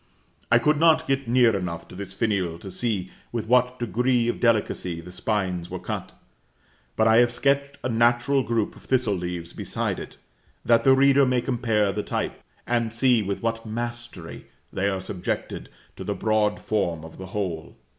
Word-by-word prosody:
I 120 Hz, -, +7 dB
could 150 Hz, +5 st, +2 dB
not 160 Hz, -1 st, +4 dB
get 135 Hz, -1 st, 0 dB
near 120 Hz, -2 st, +4 dB
enough 90 Hz, -3 st, -4 dB
to -, -, -12 dB
this 95 Hz, 0 st, -7 dB
finial 95 Hz, -7 st, 0 dB
to 95 Hz, +3 st, -9 dB
see 95 Hz, -2 st, -2 dB, 0.2 s
with 115 Hz, -3 st, -3 dB
what 125 Hz, +2 st, +3 dB
degree 120 Hz, +1 st, +1 dB
of -, -, -2 dB
delicacy 105 Hz, -7 st, +1 dB
the 85 Hz, +2 st, -10 dB
spines 90 Hz, -4 st, -2 dB
were -, -, -4 dB
cut; -, -, -5 dB, 0.8 s
but 110 Hz, -, +3 dB
I 110 Hz, 0 st, +6 dB
have 120 Hz, 0 st, +5 dB
sketched 140 Hz, +3 st, 0 dB
a -, -, 0 dB
natural 120 Hz, +4 st, +3 dB
group 115 Hz, -4 st, -1 dB
of -, -, -16 dB
thistle 125 Hz, -5 st, +1 dB
leaves 90 Hz, -2 st, -4 dB
beside -, -, -3 dB
it, -, -, -9 dB, 0.5 s
that 115 Hz, -1 st, +4 dB
the 135 Hz, -1 st, +6 dB
reader 140 Hz, 0 st, +5 dB
may 125 Hz, -1 st, +2 dB
compare 115 Hz, -5 st, +1 dB
the -, -, -2 dB
types, -, -, -3 dB, 0.2 s
and 115 Hz, -2 st, 0 dB
see 120 Hz, 0 st, +3 dB
with 100 Hz, +2 st, -3 dB
what 115 Hz, 0 st, -1 dB
mastery 120 Hz, -6 st, -6 dB, 0.3 s
they 100 Hz, +1 st, +1 dB
are 95 Hz, -1 st, -2 dB
subjected 95 Hz, -1 st, -4 dB, 0.3 s
to -, -, -6 dB
the -, -, -2 dB
broad 110 Hz, -1 st, +1 dB
form 85 Hz, -7 st, -1 dB
of 80 Hz, -, -12 dB
the 95 Hz, -, -7 dB
whole. 90 Hz, -5 st, -4 dB
115 Hz, 180 wpm, -25 LUFS, 95-125 Hz, 0.8 s, I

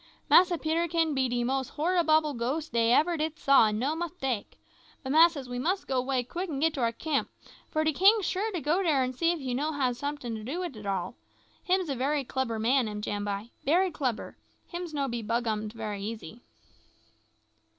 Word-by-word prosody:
Massa 355 Hz, -1 st, +6 dB
Peterkin 325 Hz, 0 st, 0 dB
be 265 Hz, -2 st, +1 dB
de 240 Hz, 0 st, 0 dB
most 265 Hz, +1 st, -2 dB
horriboble 315 Hz, -2 st, +2 dB
ghost 265 Hz, +5 st, -3 dB
dey 230 Hz, 0 st, +3 dB
ever 325 Hz, +6 st, +3 dB
did 310 Hz, 0 st, -2 dB
saw, 275 Hz, -7 st, +5 dB
an' 210 Hz, 0 st, -1 dB
no 275 Hz, +7 st, 0 dB
mistake. 295 Hz, -, -4 dB, 0.5 s
But, 265 Hz, -, -3 dB
massas, 315 Hz, -3 st, +5 dB
we 245 Hz, 0 st, -4 dB
mus' 365 Hz, +9 st, -1 dB
go 260 Hz, -2 st, 0 dB
'way 255 Hz, -1 st, -1 dB
quick 350 Hz, +9 st, -5 dB
an' 280 Hz, -3 st, -3 dB
git 320 Hz, +1 st, +2 dB
to 270 Hz, -, -3 dB
our 230 Hz, -1 st, +2 dB
camp, 290 Hz, +5 st, -2 dB, 0.4 s
for 310 Hz, -, 0 dB
de 315 Hz, 0 st, +1 dB
king 400 Hz, +7 st, +6 dB
sure 405 Hz, +5 st, -1 dB
to 355 Hz, -5 st, -3 dB
go 320 Hz, +6 st, +1 dB
dere 300 Hz, -8 st, +2 dB
an' 255 Hz, 0 st, -2 dB
see 335 Hz, +6 st, +2 dB
if 345 Hz, -, -3 dB
you 260 Hz, -3 st, -3 dB
no 300 Hz, +5 st, -1 dB
hab 260 Hz, -4 st, 0 dB
someting 285 Hz, -2 st, -4 dB
to 220 Hz, -1 st, -6 dB
do 280 Hz, +10 st, -4 dB
wid 345 Hz, -8 st, -5 dB
it 210 Hz, -1 st, -8 dB
all. 190 Hz, -3 st, -2 dB, 0.5 s
Him's 370 Hz, -1 st, +1 dB
a 275 Hz, -, -2 dB
bery 280 Hz, +3 st, 0 dB
clebber 255 Hz, -3 st, -2 dB
king, 245 Hz, +2 st, +2 dB
am 210 Hz, 0 st, -5 dB
Jambai 205 Hz, +2 st, -3 dB
bery 355 Hz, +6 st, +3 dB
clebber; 255 Hz, -8 st, -3 dB, 0.3 s
him's 345 Hz, -1 st, -5 dB
no 285 Hz, -2 st, -1 dB
be 235 Hz, -2 st, -3 dB
bughummed 220 Hz, -1 st, -2 dB
bery 210 Hz, -3 st, -4 dB
easy." 215 Hz, 0 st, -7 dB
275 Hz, 200 wpm, -28 LUFS, 235-320 Hz, 0.5 s, Massa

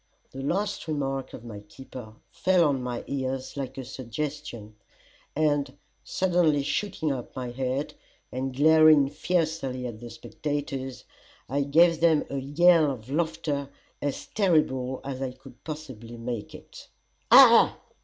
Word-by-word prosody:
The 135 Hz, -, -7 dB
last 195 Hz, +7 st, -2 dB
remark 135 Hz, -3 st, -2 dB
of 120 Hz, -, -10 dB
my 110 Hz, -3 st, -8 dB
keeper 110 Hz, +1 st, -11 dB, 0.2 s
fell 185 Hz, -2 st, +3 dB
on 135 Hz, -3 st, 0 dB
my 125 Hz, -1 st, -4 dB
ears 130 Hz, -1 st, -3 dB
like 135 Hz, -2 st, -5 dB
a 130 Hz, -, -5 dB
suggestion, 130 Hz, -3 st, -6 dB, 0.6 s
and 145 Hz, -3 st, 0 dB, 0.3 s
suddenly 170 Hz, -6 st, +2 dB
shooting 170 Hz, -1 st, -1 dB
up 125 Hz, -3 st, -6 dB
my 125 Hz, -2 st, -4 dB
head, 130 Hz, +3 st, -2 dB, 0.4 s
and 130 Hz, +1 st, -3 dB
glaring 155 Hz, -1 st, +6 dB
fiercely 155 Hz, -7 st, -1 dB
at 115 Hz, -3 st, -6 dB
the 120 Hz, 0 st, -9 dB
spectators, 140 Hz, -2 st, -5 dB, 0.4 s
I 140 Hz, +3 st, 0 dB
gave 165 Hz, +4 st, +4 dB
them 160 Hz, -3 st, +4 dB
a 140 Hz, -, -2 dB
yell 155 Hz, +3 st, +4 dB
of 130 Hz, -2 st, -7 dB
laughter 155 Hz, -3 st, -1 dB, 0.3 s
as 145 Hz, -1 st, -3 dB
terrible 140 Hz, -10 st, +1 dB
as 135 Hz, -1 st, -5 dB
I 130 Hz, -2 st, -3 dB
could 130 Hz, -1 st, -16 dB
possibly 130 Hz, -7 st, -8 dB
make 115 Hz, -2 st, -5 dB
it. -, -, -13 dB, 0.4 s
"Ah!" -, -, +8 dB
140 Hz, 135 wpm, -27 LUFS, 130-155 Hz, 0.6 s, Ah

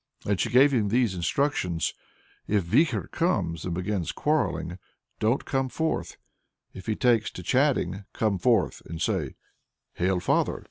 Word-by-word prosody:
And 100 Hz, -2 st, 0 dB
she -, -, 0 dB
gave 135 Hz, +4 st, +6 dB
him 110 Hz, -5 st, +2 dB
these 120 Hz, -2 st, +2 dB
instructions. 90 Hz, -, 0 dB, 0.5 s
"If 105 Hz, -2 st, +2 dB
Vikhor 150 Hz, -, +1 dB
comes, 90 Hz, -, 0 dB
and 90 Hz, -2 st, -2 dB
begins 90 Hz, -1 st, -2 dB
quarrelling, 90 Hz, -, -1 dB, 0.4 s
don't 115 Hz, +5 st, +1 dB
come 135 Hz, -1 st, -1 dB
forth, 160 Hz, +4 st, -2 dB, 0.6 s
but -, -, -9 dB
if 95 Hz, -, -12 dB
he 110 Hz, -, 0 dB
takes 115 Hz, -3 st, +2 dB
to 90 Hz, -, -8 dB
chatting, 100 Hz, -, +1 dB
come 105 Hz, -4 st, 0 dB
forth 115 Hz, 0 st, +2 dB
and 85 Hz, 0 st, -6 dB
say, 90 Hz, -, -1 dB, 0.6 s
'Hail 90 Hz, +1 st, +1 dB
father!' -, -, +1 dB
105 Hz, 150 wpm, -26 LUFS, 90-130 Hz, 0.6 s, gave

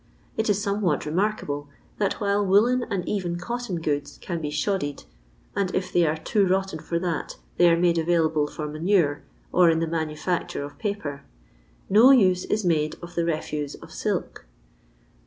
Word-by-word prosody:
It 220 Hz, 0 st, 0 dB
is 205 Hz, -1 st, +2 dB
somewhat 200 Hz, -7 st, 0 dB
remarkable, 150 Hz, -4 st, -1 dB, 0.3 s
that 200 Hz, -2 st, +1 dB
while 205 Hz, -1 st, +1 dB
woollen 225 Hz, +6 st, +4 dB
and 185 Hz, -3 st, -2 dB
even 180 Hz, -4 st, -1 dB
cotton 220 Hz, -1 st, -4 dB
goods 145 Hz, -3 st, -2 dB
can 170 Hz, -3 st, -4 dB
be 150 Hz, -, -2 dB
"shoddied" 150 Hz, -1 st, -2 dB, 0.3 s
— -, -, -33 dB
and 200 Hz, -2 st, +1 dB
if 185 Hz, -, -2 dB
they 175 Hz, -2 st, +4 dB
are 155 Hz, +1 st, 0 dB
too 195 Hz, +5 st, +1 dB
rotten 190 Hz, -2 st, 0 dB
for 170 Hz, -, -2 dB
that, 170 Hz, -3 st, -3 dB, 0.2 s
they 175 Hz, 0 st, +6 dB
are 165 Hz, -, +4 dB
made 170 Hz, -1 st, +3 dB
available 160 Hz, -2 st, +2 dB
for 150 Hz, 0 st, -5 dB
manure, 155 Hz, -1 st, +1 dB, 0.3 s
or 180 Hz, -2 st, +5 dB
in 165 Hz, -, +3 dB
the 165 Hz, -, +1 dB
manufiicture 160 Hz, -1 st, -2 dB
of 145 Hz, -, -12 dB
paper 180 Hz, -10 st, -4 dB, 0.3 s
— -, -, -23 dB
^ne 250 Hz, +6 st, +8 dB
use 185 Hz, -3 st, +2 dB
is 210 Hz, -2 st, -1 dB
made 155 Hz, -3 st, +1 dB
of 170 Hz, 0 st, -8 dB
the 170 Hz, -1 st, 0 dB
refuse 150 Hz, -3 st, -2 dB
of -, -, -13 dB
silk. -, -, -3 dB
175 Hz, 175 wpm, -25 LUFS, 155-200 Hz, 0.3 s, ^ne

